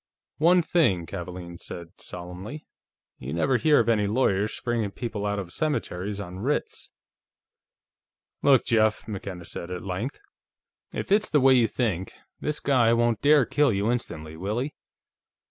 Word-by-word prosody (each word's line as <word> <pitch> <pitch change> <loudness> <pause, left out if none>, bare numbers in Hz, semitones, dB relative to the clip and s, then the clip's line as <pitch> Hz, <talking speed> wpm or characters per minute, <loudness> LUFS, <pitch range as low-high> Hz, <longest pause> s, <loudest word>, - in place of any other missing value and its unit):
"One 175 +3 +5
thing," 100 - +2
Kavaalen 85 0 -7
said 85 -1 -8
solemnly, 90 - -8 0.5
"you 70 +5 -5
never 130 +10 +2
hear 150 +2 +4
of 115 - +2
any 105 -3 +3
lawyers 105 -2 +1
springing 115 -4 -1
people 105 -1 -4
out 100 0 -1
of 95 -3 -5
cemeteries 105 - -2
on 90 -2 -7
writs." 140 +8 -2 1.5
"Look, 135 -4 +5
Jeff," 110 -3 +2
McKenna 95 -4 -6
said, 85 - -7
at 90 -1 -5
length. 100 +9 -3 0.7
"If - - -5
it's 210 +1 +3
the 150 - +4
way 135 0 +6
you 120 -3 +5
think, 100 -6 -2 0.3
this 150 0 -2
guy 120 -5 +3
won't 115 -1 +2
dare 145 -2 +5
kill 145 0 +3
you 100 +3 +1
instantly, 80 -10 -4
will 100 +7 -3
he? 135 +4 -2
110 Hz, 150 wpm, -26 LUFS, 90-130 Hz, 1.5 s, way